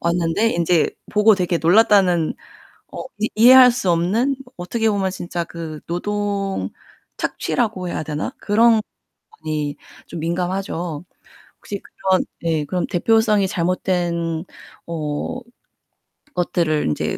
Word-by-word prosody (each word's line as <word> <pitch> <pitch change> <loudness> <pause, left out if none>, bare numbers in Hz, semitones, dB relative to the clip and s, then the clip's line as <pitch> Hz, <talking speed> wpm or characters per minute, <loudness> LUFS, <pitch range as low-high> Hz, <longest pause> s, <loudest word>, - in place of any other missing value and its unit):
왔는데 170 +6 +1
인제 170 -3 +2 0.2
보고 210 0 +5
되게 180 -2 0
놀랐다는 180 -2 +4 0.6
어 - - -6 0.2
이 215 - 0
이해할 250 +2 +8
수 215 -7 -2
없는 215 +11 +1 0.2
어떻게 220 +5 -1
보면 195 -2 0
진짜 175 -2 -4
그 165 -2 -7
노동 200 +2 -2 0.5
착취라고 210 -7 -2
해야 155 - -3
되나 155 - -4
그런 225 +1 +4 0.6
많이 150 -2 -2 0.3
좀 170 - -7
민감하죠. 175 -1 -3 0.5
혹시 200 -1 -6
그런 190 -1 0 0.2
예 160 -3 0
그럼 180 +4 -1
대표성이 215 +1 +2
잘못된 175 -3 -1 0.4
어 155 +7 -3 1.0
것들을 170 -3 0
인제 75 - -1
180 Hz, 240 characters per minute, -21 LUFS, 170-210 Hz, 1.0 s, 이해할